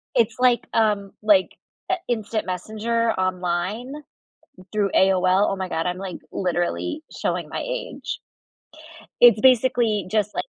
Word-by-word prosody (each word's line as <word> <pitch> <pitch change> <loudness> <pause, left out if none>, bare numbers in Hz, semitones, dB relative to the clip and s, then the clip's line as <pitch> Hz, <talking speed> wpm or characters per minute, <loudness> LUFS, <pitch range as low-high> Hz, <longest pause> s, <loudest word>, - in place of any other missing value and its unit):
It's 230 -1 +2
like, 250 -1 +3
um, 205 -3 +1
like 205 -3 +4 0.4
a - - +3
instant 220 -3 -2
messenger 220 +5 -1
online 185 +6 -2 0.8
through 205 -2 0
AOL. 190 +1 +4
Oh 195 - -1
my 190 -1 -4
god, 165 -1 -2
I'm 180 0 -2
like 190 -2 -6
literally 185 - -2
showing - - -2
my - - -4
age. - - -5 1.0
It's 235 -3 +8
basically 240 -6 +3
just 210 -1 0
like - - -1
210 Hz, 130 wpm, -23 LUFS, 185-235 Hz, 1.0 s, It's